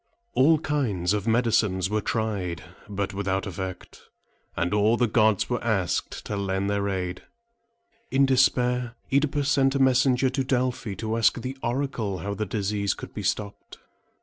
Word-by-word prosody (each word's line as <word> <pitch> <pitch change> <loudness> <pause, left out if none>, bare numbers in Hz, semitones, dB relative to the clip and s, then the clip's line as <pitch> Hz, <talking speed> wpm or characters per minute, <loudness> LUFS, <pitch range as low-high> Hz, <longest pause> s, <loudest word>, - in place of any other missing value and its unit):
All 155 +5 +5
kinds 120 - 0
of 105 +1 -2
medicines 110 -5 +2
were 105 +2 -1
tried, 100 -8 -2 0.3
but 100 0 -3
without 95 -1 -1
effect; 95 -1 -7 0.5
and 90 - 0
all 105 +3 +3
the 125 - +3
gods 110 -3 +3
were 120 -1 -2
asked 100 -7 -1
to 105 - -3
lend 100 0 -1
their 100 0 0
aid. 90 -2 -3 0.9
In 135 +1 +4
despair, 125 -2 +2 0.2
OEdipus 140 0 +2
sent 135 0 +3
a - - +1
messenger 130 0 +3
to 135 +1 -1
Delphi 125 -4 -1
to 110 +3 -2
ask 115 +1 +3
the 130 +2 -5
oracle 120 -6 -2
how 100 +4 -4
the 105 +1 -3
disease 100 -1 -1
could - - -9
be - - -5
stopped. 100 -1 -3
110 Hz, 155 wpm, -26 LUFS, 100-125 Hz, 0.9 s, All